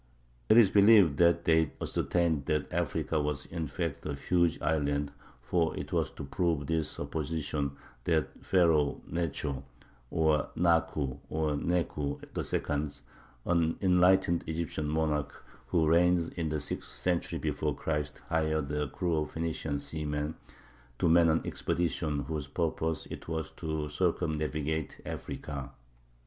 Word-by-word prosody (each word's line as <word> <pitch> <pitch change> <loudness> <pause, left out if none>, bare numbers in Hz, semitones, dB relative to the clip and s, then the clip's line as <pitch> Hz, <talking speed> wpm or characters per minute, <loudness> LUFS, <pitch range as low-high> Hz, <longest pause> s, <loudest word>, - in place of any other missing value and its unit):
It 110 - +7
is 105 -5 +7
believed 100 -7 +6
that 85 0 +4
they 80 -3 +3
ascertained 80 -5 0
that 75 -2 -1
Africa 80 -2 0
was, 75 -2 -2
in 80 -2 -4
fact, 80 +1 -3
a 70 - -2
huge 85 +2 +1
island; 70 -2 0 0.3
for 80 +5 +1
it - - -5
was - - +1
to - - -7
prove 80 0 0
this 80 0 0
supposition 75 -2 -3 0.3
that 80 -4 0
Pharaoh 80 -6 +3
Necho 75 -4 -2 0.5
(or 80 -2 +2
Naku 80 -5 +1
or 80 -1 0
Neku) 75 -2 -1 0.2
II, 75 -1 -2 0.4
an 85 -2 +2
enlightened 90 -1 +4
Egyptian 80 -1 -2
monarch 75 -2 -1 0.2
who 80 -3 +2
reigned 85 +1 +3
in 80 -3 -2
the 75 0 -1
sixth 75 - -4
century 90 -2 -1
before - - -1
Christ, 75 -2 -3
hired 80 -3 0
a 75 0 0
crew 85 +4 -1
of 75 0 -1
Phenician 80 -2 -2
seamen 75 0 -3 0.6
to 85 - +2
man 85 0 +6
an 80 +1 +3
expedition 80 -4 -1
whose 75 -3 -4
purpose 80 +1 -1
it - - -7
was 80 -2 -3
to 80 -1 -3
circumnavigate 80 -2 -1
Africa. 70 -4 -5
80 Hz, 135 wpm, -30 LUFS, 75-85 Hz, 0.6 s, It